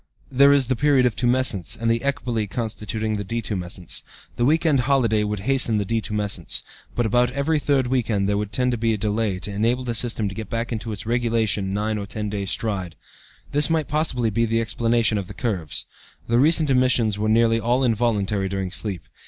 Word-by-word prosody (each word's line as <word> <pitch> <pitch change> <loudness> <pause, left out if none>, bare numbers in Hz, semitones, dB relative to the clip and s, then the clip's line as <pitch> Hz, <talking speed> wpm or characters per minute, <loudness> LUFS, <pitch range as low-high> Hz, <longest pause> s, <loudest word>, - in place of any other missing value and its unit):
There 140 +2 +6
is 140 -2 +4
the 130 +2 0
period 140 -1 +3
of 120 - +1
tumescence, 120 -7 +1
and 115 - -2
the 115 0 +2
ecbole 120 -6 -2
constituting 110 -1 -3
the 100 - -3
detumescence. 95 -5 -3 0.3
The 120 - +1
week 160 +5 +2
end 150 -4 +3
holiday 120 -5 +2
would 105 -1 -3
hasten 120 -2 +2
the 100 - -1
detumescence, 105 -4 -2 0.3
but 120 - 0
about 120 +3 +2
every 145 +3 0
third 140 -3 +1
week 125 -2 -1
end 100 -3 +1
there 100 - +1
would 105 -1 -4
tend 125 +2 +1
to 120 - -2
be 115 -1 +1
delay 105 -1 -1
to 100 +2 -5
enable 115 +5 0
the 120 -2 -2
system 115 -2 +1
to 100 - -5
get 110 0 -7
back 115 +1 -3
into 115 0 -4
its 105 - -6
regulation 115 -4 0
nine 105 +2 -1
or 100 - -6
ten 105 -1 -4
days' 100 -2 -3
stride. 95 -7 -3 0.6
This 145 +2 +4
might 160 -3 0
possibly 125 -6 0
be 115 +3 +1
the 115 +1 +1
explanation 115 -1 +1
of 95 - -6
the - - -10
curves. 95 - -2 0.4
The 115 +1 +2
recent 155 +1 +4
emissions 125 -5 +2
were 110 +1 0
nearly 115 +1 +3
all 120 +3 +1
involuntary 105 -4 0
during 95 -1 -3
sleep. 95 -5 -2
115 Hz, 200 wpm, -23 LUFS, 105-125 Hz, 0.6 s, There